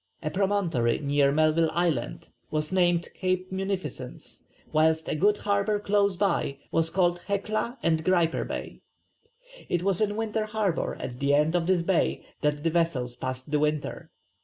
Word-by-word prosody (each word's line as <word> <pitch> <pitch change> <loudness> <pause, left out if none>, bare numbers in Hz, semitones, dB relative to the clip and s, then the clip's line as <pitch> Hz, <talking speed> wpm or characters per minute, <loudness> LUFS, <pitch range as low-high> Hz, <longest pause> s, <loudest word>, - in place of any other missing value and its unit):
A 155 - -2
promontory 180 - +1
near 140 -1 +2
Melville 155 +2 +3
Island 165 -7 -1 0.2
was 155 +1 -2
named 175 -2 +2
Cape 185 0 -1
Munificence, 190 -10 -5 0.3
whilst 160 +1 +3
a - - -1
good 205 +7 +3
harbour 205 +1 +1
close 200 -1 +2
by 175 -7 0
was 165 0 +2
called 175 0 +1
Hecla 215 +5 -1
and 160 -1 +2
Griper 170 -3 +2
Bay. - - -6 0.9
It 175 0 0
was 195 0 +1
in 210 -1 +1
Winter 220 0 -1
Harbour 210 -5 -1
at 125 0 -6
the 140 +1 +3
end 150 +2 +2
of 170 -1 +1
this 185 -2 +2
bay 185 0 +1 0.2
that 150 -1 0
the 165 - +1
vessels 150 -8 0
passed 130 +2 -5
the 150 - +2
winter. 150 0 -2
170 Hz, 160 wpm, -27 LUFS, 150-195 Hz, 0.9 s, Melville